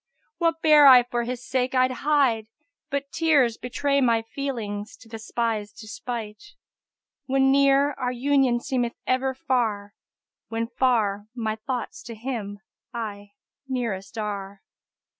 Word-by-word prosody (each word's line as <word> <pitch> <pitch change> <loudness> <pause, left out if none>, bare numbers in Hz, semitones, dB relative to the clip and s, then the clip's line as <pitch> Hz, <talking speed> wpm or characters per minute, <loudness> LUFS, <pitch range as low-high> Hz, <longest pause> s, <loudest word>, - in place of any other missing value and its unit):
What 330 -1 0
bear 300 -2 +8
I 255 -2 +9
for 240 -1 -2
his 250 +1 -5
sake 255 0 0
I'd 255 0 +3
hide, 255 -6 +1 0.4
but 280 0 -3
tears 300 -8 +3
* - - -51
Betray 280 +3 0
my 230 -3 +3
feelings 225 -5 -5
to 230 - -17
the 225 0 -8
spy's 220 -2 -2
despight. 230 - -7 0.7
When 270 0 +3
near, 275 +1 +4
our 250 0 -1
union 260 -1 +2
seemeth 245 -2 -1
ever 260 +1 0
far; 220 -6 -1 0.3
* - - -68
When 230 0 -1
far, 220 -5 +1
my 220 -3 -2
thoughts 250 - -5
to 230 - -7
him 215 -4 -5 0.3
aye 205 -4 -6 0.3
nearest 230 -6 -3
are." 200 -2 -5
245 Hz, 140 wpm, -25 LUFS, 220-270 Hz, 0.7 s, I